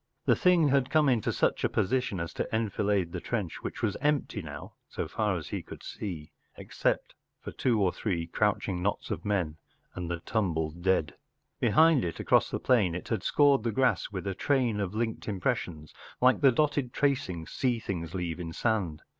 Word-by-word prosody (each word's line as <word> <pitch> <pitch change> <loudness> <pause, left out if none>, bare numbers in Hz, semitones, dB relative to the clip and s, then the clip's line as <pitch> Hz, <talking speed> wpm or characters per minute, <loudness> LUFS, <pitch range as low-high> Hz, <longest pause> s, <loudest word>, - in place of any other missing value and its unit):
The - - +5
thing 175 -5 +4
had 135 -1 +2
come 155 0 +3
into 120 -5 +2
such - - 0
a - - +2
position 125 -3 0
as 85 0 -4
to - - -3
enfilade 100 -4 0
the - - -4
trench, 105 -9 -3
which - - -6
was 100 - +1
empty 145 -7 0
now, 75 -3 -9 0.2
so - - -4
far 105 -4 0
as 80 -3 -7
he - - -3
could - - -11
see, 85 -7 -6 0.3
except - - -1 0.3
for - - -7
two 120 -4 +1
or 95 -3 +2
three 90 -6 -2
crouching 95 0 0
knots 100 +3 -2
of - - -3
men 90 -7 -1 0.4
and 90 -2 -5
the 85 -1 -2
tumbled 85 -9 -1
looking - - -12
dead. 90 -4 +1 0.5
Behind 160 -3 +5
it, 85 -2 -4
across - - +3
the - - -3
plain, 105 -10 +2
it 90 - -6
had 115 - 0
scored 140 -4 +4
the 115 +1 -1
grass 130 +3 +1
with 95 -2 -5
a 100 - -1
train 125 -1 +1
of 100 0 -3
linked 115 0 -2
impressions, 90 - -2 0.3
like 125 +1 +4
the 135 -2 +7
dotted 140 -1 0
tracings 95 - -1
sea 125 -3 0
things 90 -6 -5
leave 90 -2 -3
in 80 -2 -5
sand. 95 -9 -1
105 Hz, 195 wpm, -29 LUFS, 85-125 Hz, 0.5 s, the